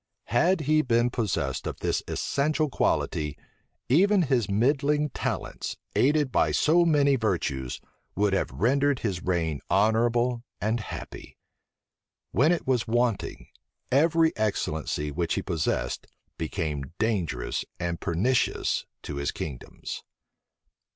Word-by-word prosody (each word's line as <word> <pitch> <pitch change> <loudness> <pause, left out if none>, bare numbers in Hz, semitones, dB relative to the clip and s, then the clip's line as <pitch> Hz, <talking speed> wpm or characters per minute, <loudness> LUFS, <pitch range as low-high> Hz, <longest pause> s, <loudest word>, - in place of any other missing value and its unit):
Had 170 +8 +3
he 155 +1 +3
been 120 -2 +2
possessed 110 -6 -1
of - - -4
this - - 0
essential 150 +1 0
quality, 75 - 0 0.5
even 190 +7 +4
his 130 - +1
middling 140 +7 +2
talents, - - -3 0.2
aided 145 0 +3
by - - +3
so 170 +3 +4
many 145 -4 +4
virtues, 80 - -1 0.4
would 100 0 +2
have 95 - +1
rendered 135 - +1
his 95 -5 -1
reign 80 -5 0
honorable 120 +4 +2 0.2
and 110 +3 0
happy. 110 - -8 0.9
When 145 +8 +4
it 175 - 0
was 125 -3 +1
wanting, 120 -2 -1 0.4
every 160 +4 +4
excellency 80 -8 -1
which 85 +2 -1
he - - -2
possessed 80 -4 -1 0.3
became 80 -3 -3
dangerous 95 - -1 0.2
and 85 -1 -2
pernicious 115 +10 +1 0.2
to 70 - -5
his 70 0 -1
kingdoms. 70 -6 -6
115 Hz, 115 wpm, -27 LUFS, 85-140 Hz, 0.9 s, even